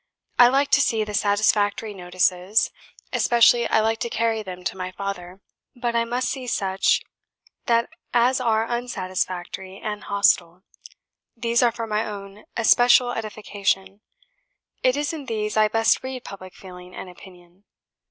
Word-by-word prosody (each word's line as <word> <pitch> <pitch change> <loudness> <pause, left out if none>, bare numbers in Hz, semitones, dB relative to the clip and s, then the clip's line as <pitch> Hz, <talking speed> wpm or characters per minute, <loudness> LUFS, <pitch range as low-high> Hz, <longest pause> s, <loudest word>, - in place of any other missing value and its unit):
I 245 - +9
like 275 +3 +2
to 285 - +5
see 225 -4 +1
the 210 0 -6
satisfactory 205 +1 +1
notices, 180 +2 +1 0.4
especially 235 0 +4
I 220 - +3
like 225 +1 0
to 235 - -2
carry 225 -1 0
them 180 -3 -8
to - - -3
my 185 -1 -5
father; 190 -1 -6 0.3
but 240 -1 -2
I 230 0 +2
MUST 245 +2 -1
see 260 -2 -4
such 195 -4 +1 1.1
as 250 +2 +3
are 225 -2 +2
UNsatisfactory 190 -5 -4
and 210 -1 -5
hostile; 185 -3 +2 0.7
these 235 +1 +1
are 240 -1 +4
for 230 0 -5
my 215 0 -1
own 200 -1 -8
especial 245 +2 +5
edification; 205 -3 -3 0.8
it 255 +2 +2
is 295 +2 -1
in 300 -4 -6
these 215 -2 -2
I 215 0 +4
best 225 +1 +2
read 260 -1 -6
public 185 -2 -10
feeling 180 -1 -12
and - - -7
opinion. 180 +1 -16
215 Hz, 145 wpm, -23 LUFS, 190-235 Hz, 1.1 s, I